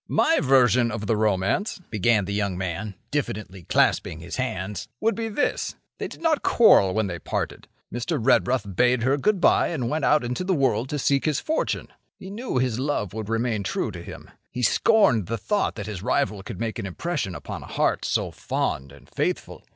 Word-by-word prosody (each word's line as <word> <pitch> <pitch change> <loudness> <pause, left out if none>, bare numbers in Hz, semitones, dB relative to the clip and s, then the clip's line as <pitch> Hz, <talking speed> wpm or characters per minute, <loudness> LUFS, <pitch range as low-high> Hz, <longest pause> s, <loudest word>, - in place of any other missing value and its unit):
"My 325 - +3
version 125 - +4
of 105 -1 -4
the 110 - +1
romance," 105 - 0
began 110 -1 +2
the 100 - -4
young 100 -3 -1
man, 95 +3 -4 0.2
diffidently 105 -9 -3
clasping 80 - +2
his 85 +2 -6
hands, 105 -6 -3
"would 225 +1 +2
be 225 0 -3
this: 255 +7 -1 0.2
They - - -2
did - - -12
not 320 -3 +2
quarrel 100 - +5
when 110 -1 +2
they 85 -3 -4
parted. - - -4 0.3
Mr. 120 0 -1
Redruth 115 -3 +2
bade 125 +2 +3
her 135 +3 +3
good 200 +7 +1
by - - +4
and 135 -8 -2
went 155 -1 -1
out 150 -1 +4
into 125 +8 -2
the 185 0 +1
world 130 -4 +1
to 150 - -2
seek 140 0 +1
his 150 -2 +1
fortune. 315 - -1 0.3
He 190 - -9
knew 230 - -3
his 125 -2 0
love 130 -9 -1
would 110 -1 -5
remain 115 -1 0
true 100 +3 -2
to 90 -3 -8
him. - - -10 0.2
He 125 - -4
scorned 125 - +4
the 115 - -2
thought 205 - 0
that 100 - -5
his 100 -4 -6
rival 105 -3 0
could 95 -1 -8
make 110 -3 -3
an 100 - -3
impression 95 - -3
upon - - -7
a - - -10
heart - - 0
so - - 0
fond 70 0 -2
and 70 -1 -16
faithful. - - -3
115 Hz, 200 wpm, -25 LUFS, 100-145 Hz, 0.3 s, quarrel